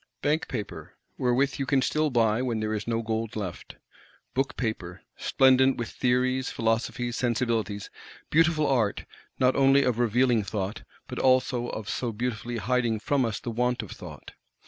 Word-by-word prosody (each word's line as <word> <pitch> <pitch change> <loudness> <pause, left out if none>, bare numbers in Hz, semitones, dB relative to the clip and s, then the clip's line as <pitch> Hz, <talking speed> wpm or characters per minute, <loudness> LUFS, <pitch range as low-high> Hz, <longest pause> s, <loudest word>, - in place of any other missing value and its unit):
Bank 150 +2 +1
paper, 110 -6 -6 0.2
wherewith 130 +2 +1
you 135 - -2
can 135 -2 +3
still 155 0 +1
buy 115 -2 +2
when 120 -3 -1
there 110 0 -1
is 105 0 -3
no 115 0 0
gold 110 0 -3
left; 100 -5 -6 0.6
Book 135 +1 -1
paper, 95 -7 -4
splendent 130 0 +4
with 120 -2 -3
Theories, 130 +1 +1
Philosophies, 115 +1 -1
Sensibilities,—beautiful 120 - 0
art, 120 -8 +1 0.3
not 130 0 +3
only 135 +1 +5
of 120 -3 0
revealing 120 0 +3
Thought, 100 0 -3 0.3
but - - -5
also 130 -1 +2
of 110 -3 -6
so 120 +1 -2
beautifully 120 +1 -3
hiding 120 -2 0
from 140 +3 +1
us 110 -2 -2
the 120 - -5
want 125 +2 0
of - - -10
Thought! - - -10
120 Hz, 155 wpm, -27 LUFS, 110-130 Hz, 0.6 s, only